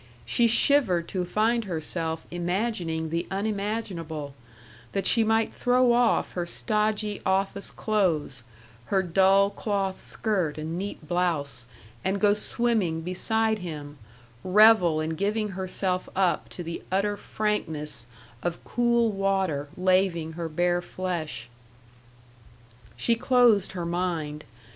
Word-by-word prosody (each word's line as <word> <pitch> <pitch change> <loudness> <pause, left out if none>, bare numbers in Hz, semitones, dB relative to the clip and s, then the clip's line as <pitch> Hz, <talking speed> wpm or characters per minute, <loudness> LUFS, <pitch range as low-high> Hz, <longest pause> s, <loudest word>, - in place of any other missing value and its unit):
She 235 - +3
shivered 225 - +3
to 185 -2 -1
find 220 +5 +1
herself 160 -2 -3
imagining 175 -3 -2
the 170 +1 -2
unimaginable 195 -7 -3 0.6
that 195 - -1
she 230 - +6
might 225 0 +1
throw 250 0 +3
off 240 -1 +2
her 175 -1 -3
stodgy 210 +1 -1
office 195 +1 0
clothes, 170 - 0 0.4
her 190 -1 +1
dull 195 +3 +4
cloth 200 -2 -2
skirt 185 -9 -1
and 155 +2 -4
neat 185 -4 -6
blouse, 160 -8 -1 0.4
and 195 +1 0
go 205 0 +4
swimming 210 -6 0
beside 220 +5 0
him, 150 -5 -7 0.4
revel 190 -4 +6
in 155 +1 -2
giving 210 +5 -1
herself 185 -1 -2
up 185 -2 +1
to 175 - -7
the 165 0 -5
utter 200 +2 +1
frankness 160 - -2 0.3
of 175 +3 -3
cool 235 -1 +2
water 190 -7 -1
laving 185 -3 +2
her 165 0 -4
bare 175 +2 +1
flesh. 175 -9 -4 1.5
She 235 - +2
closed 230 -5 +3
her 175 -2 -4
mind. 170 -4 -2
185 Hz, 120 wpm, -26 LUFS, 165-210 Hz, 1.5 s, she